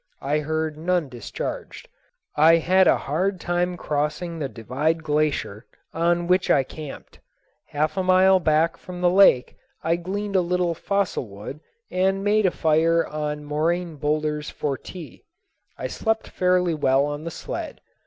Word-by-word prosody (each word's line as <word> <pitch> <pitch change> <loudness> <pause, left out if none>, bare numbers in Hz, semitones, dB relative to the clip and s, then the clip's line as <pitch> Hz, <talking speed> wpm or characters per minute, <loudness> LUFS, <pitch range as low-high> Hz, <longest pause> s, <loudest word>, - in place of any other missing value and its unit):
I 145 +3 +1
heard 155 0 -2
none 175 -3 0
discharged. 120 -3 -6 0.5
I 160 +2 +6
had 185 +3 +4
a - - +5
hard 180 +6 -1
time 175 +1 -1
crossing 150 +3 -2
the 140 -3 -3
Divide 145 +9 -2
Glacier, 150 -8 -1 0.3
on 170 +1 +1
which 180 +1 +2
I 135 - +4
camped. 150 +2 -10 0.5
Half 155 +5 -1
a - - +2
mile 185 +1 +5
back 160 0 +2
from 180 0 -9
the 175 -1 +4
lake 180 -10 +5 0.3
I 165 +1 +1
gleaned 200 +3 -4
a 185 - +5
little 175 -1 0
fossil 200 - -1
wood 105 +8 -9 0.3
and 190 +1 +1
made 210 0 +3
a - - +4
fire 165 0 +2
on 150 -1 -4
moraine 165 +2 -1
boulders 150 0 -1
for 145 -2 -2
tea. 170 +2 -11 0.5
I - - -5
slept 220 0 -1
fairly 180 -1 +2
well 135 -2 +2
on 145 +1 -4
the 165 - -4
sled. - - -6
165 Hz, 155 wpm, -24 LUFS, 150-180 Hz, 0.5 s, I